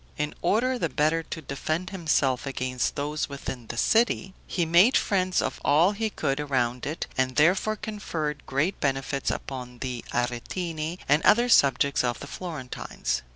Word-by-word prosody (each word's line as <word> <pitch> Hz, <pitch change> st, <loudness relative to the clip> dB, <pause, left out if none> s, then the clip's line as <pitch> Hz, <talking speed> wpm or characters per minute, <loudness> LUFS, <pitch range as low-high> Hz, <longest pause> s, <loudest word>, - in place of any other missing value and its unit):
In 150 Hz, -, -2 dB
order 245 Hz, +8 st, +1 dB
the -, -, 0 dB
better 155 Hz, +2 st, +1 dB
to 160 Hz, 0 st, -7 dB
defend 155 Hz, +7 st, -3 dB
himself 145 Hz, -8 st, +1 dB
against 130 Hz, -2 st, -2 dB
those 150 Hz, +1 st, -2 dB
within 130 Hz, -4 st, -6 dB
the 120 Hz, -, -6 dB
city, 220 Hz, -, +2 dB
he 175 Hz, -, 0 dB
made 175 Hz, +10 st, +6 dB
friends 185 Hz, -2 st, +1 dB
of -, -, -4 dB
all 165 Hz, +7 st, +4 dB
he 220 Hz, +1 st, -2 dB
could 140 Hz, -8 st, -1 dB
around 125 Hz, -4 st, -1 dB
it, 155 Hz, +3 st, -3 dB
and 130 Hz, 0 st, +1 dB
therefore 185 Hz, +8 st, +3 dB
conferred 165 Hz, -9 st, -4 dB
great 145 Hz, +8 st, 0 dB
benefits 135 Hz, 0 st, -1 dB
upon 125 Hz, -2 st, -5 dB
the 125 Hz, -1 st, -4 dB
Aretini 155 Hz, +7 st, -2 dB
and 150 Hz, +3 st, +4 dB
other 240 Hz, +3 st, +5 dB
subjects 140 Hz, -, +4 dB
of 120 Hz, -1 st, -1 dB
the -, -, -7 dB
Florentines. 130 Hz, -, -4 dB
150 Hz, 155 wpm, -26 LUFS, 130-180 Hz, -, made